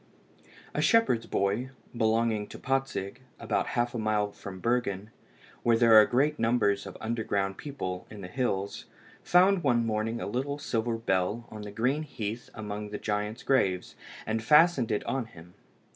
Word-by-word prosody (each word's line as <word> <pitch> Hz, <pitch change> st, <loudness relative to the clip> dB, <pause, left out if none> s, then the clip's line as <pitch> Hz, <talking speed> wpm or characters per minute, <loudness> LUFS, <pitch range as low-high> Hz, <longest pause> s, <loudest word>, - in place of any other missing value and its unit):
A -, -, 0 dB
shepherd's 230 Hz, -, +3 dB
boy, 100 Hz, +6 st, 0 dB, 0.3 s
belonging 110 Hz, -2 st, +1 dB
to -, -, -10 dB
Patzig, 135 Hz, -5 st, -2 dB, 0.2 s
about -, -, -1 dB
half 120 Hz, 0 st, +1 dB
a 120 Hz, -, -3 dB
mile 105 Hz, -1 st, 0 dB
from 95 Hz, -2 st, -9 dB
Bergen, 110 Hz, -3 st, -1 dB, 0.5 s
where 115 Hz, -1 st, +3 dB
there 115 Hz, -1 st, +5 dB
are 110 Hz, -1 st, +9 dB
great 140 Hz, +5 st, +1 dB
numbers 115 Hz, -3 st, +1 dB
of -, -, -9 dB
underground 100 Hz, -4 st, -1 dB
people 95 Hz, -11 st, -5 dB
in 105 Hz, -2 st, -10 dB
the 90 Hz, -, -6 dB
hills, 100 Hz, -3 st, -2 dB, 0.4 s
found 185 Hz, +1 st, +4 dB
one 120 Hz, -5 st, +2 dB
morning 110 Hz, +1 st, -1 dB
a -, -, -4 dB
little 135 Hz, +6 st, -2 dB
silver 115 Hz, -4 st, -1 dB
bell 105 Hz, +1 st, -1 dB
on 110 Hz, -, -7 dB
the 105 Hz, 0 st, -7 dB
green 125 Hz, +8 st, 0 dB
heath 115 Hz, -6 st, -5 dB
among 105 Hz, -1 st, -5 dB
the 105 Hz, -, -4 dB
giants' 105 Hz, +2 st, -3 dB
graves, 95 Hz, -9 st, +1 dB, 0.3 s
and 110 Hz, +1 st, -1 dB
fastened 150 Hz, -1 st, +5 dB
it 105 Hz, -, 0 dB
on 135 Hz, -3 st, -2 dB
him. 90 Hz, -5 st, -15 dB
115 Hz, 160 wpm, -28 LUFS, 105-125 Hz, 0.5 s, are